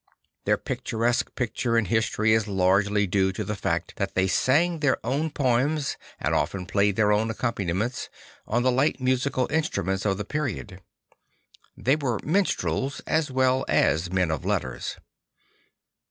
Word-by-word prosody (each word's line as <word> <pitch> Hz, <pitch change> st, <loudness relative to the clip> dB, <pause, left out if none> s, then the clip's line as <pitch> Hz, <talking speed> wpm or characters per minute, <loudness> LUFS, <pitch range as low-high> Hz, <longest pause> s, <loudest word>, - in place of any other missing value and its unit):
Their -, -, +3 dB
picturesque 115 Hz, +2 st, -1 dB
posture 115 Hz, -1 st, 0 dB
in 115 Hz, -, +2 dB
history 110 Hz, +1 st, +2 dB
is 110 Hz, -1 st, +2 dB
largely 100 Hz, +2 st, +2 dB
due 95 Hz, 0 st, +1 dB
to -, -, -3 dB
the 105 Hz, -, -3 dB
fact -, -, -2 dB
that -, -, -3 dB
they 95 Hz, -, +3 dB
sang 160 Hz, -, +2 dB
their 145 Hz, -3 st, +2 dB
own 140 Hz, +6 st, 0 dB
poems 140 Hz, +2 st, 0 dB, 0.2 s
and -, -, 0 dB
often 90 Hz, -2 st, -1 dB
played 100 Hz, +1 st, +1 dB
their 105 Hz, -1 st, +3 dB
own 110 Hz, +2 st, +2 dB
accompaniments, 110 Hz, 0 st, -2 dB, 0.4 s
on 120 Hz, +3 st, +1 dB
the 130 Hz, -, +3 dB
light 135 Hz, +5 st, +1 dB
musical 130 Hz, 0 st, +1 dB
instruments 100 Hz, -, -1 dB
of 100 Hz, -2 st, +1 dB
the 105 Hz, -, -4 dB
period; 120 Hz, -9 st, -4 dB, 1.0 s
they 130 Hz, -, +2 dB
\vere 135 Hz, -7 st, 0 dB
minstrels 155 Hz, -5 st, 0 dB
as 155 Hz, -2 st, +1 dB
well 130 Hz, 0 st, +2 dB
as 85 Hz, +3 st, +2 dB
men 90 Hz, -3 st, +1 dB
of 80 Hz, -, -3 dB
letters. -, -, -2 dB
115 Hz, 150 wpm, -25 LUFS, 100-130 Hz, 1.0 s, Their